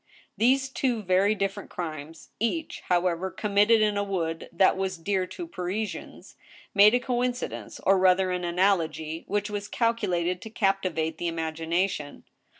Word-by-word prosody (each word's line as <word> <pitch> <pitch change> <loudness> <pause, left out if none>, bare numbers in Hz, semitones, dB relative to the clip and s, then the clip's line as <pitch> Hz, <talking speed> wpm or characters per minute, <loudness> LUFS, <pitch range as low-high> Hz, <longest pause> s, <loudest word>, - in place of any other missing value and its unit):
These 265 +3 +3
two 250 -4 -1
very 190 +3 +3
different 195 0 -3
crimes— 160 -2 -7
<ach. 310 +8 -2
however, 180 0 +1
committed 210 +3 +3
in 210 -1 +2
a 205 - +1
wood 165 -5 -3
that 180 +2 +4
was 190 -1 -2
dear 185 +2 -1
to 345 - -7
Parisians 205 - -5 0.2
— - - -19
made 210 +3 +7
a - - +3
coincidence, 245 0 -3
or 195 0 +4
rather 185 0 +4
an. 180 0 -2
analogy, 170 -3 0
which 205 +1 -1
was 205 0 -4
calculated 185 -7 0
to 220 - -8
captivate 185 -7 0
the 175 - -1
imagination. 165 0 -2
190 Hz, 150 wpm, -27 LUFS, 170-210 Hz, 0.2 s, made